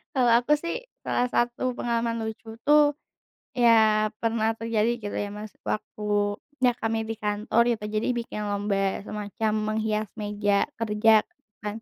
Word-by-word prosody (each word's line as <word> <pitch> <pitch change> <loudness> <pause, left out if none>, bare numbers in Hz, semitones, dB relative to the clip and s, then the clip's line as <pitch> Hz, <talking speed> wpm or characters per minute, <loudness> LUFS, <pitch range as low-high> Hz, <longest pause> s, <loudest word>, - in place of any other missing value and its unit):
Kalau 245 -3 +4
aku 265 +5 +2
sih, 340 +11 -4 0.2
salah 250 - +1
satu 245 +1 0
pengalaman 230 -1 -1
lucu 220 0 -7
tuh, 295 -1 +6 0.6
ya 220 -3 +5
pernah 225 -1 +1
terjadi 225 0 0
gitu 205 -1 -5
ya 205 - -2
Mas, 210 0 -8
waktunya 210 +5 -1
kami 225 0 -1
di 225 - -2
kantor 210 +2 +1
gitu, 215 -2 -6
jadi 215 +1 -1
bikin 230 -3 -4
lomba 200 -1 -1
semacam 210 +1 -3 0.2
menghias 215 0 0
meja 205 -1 0
kerja 220 0 +4 0.4
kan, 210 +2 -4
220 Hz, 135 wpm, -26 LUFS, 210-235 Hz, 0.6 s, tuh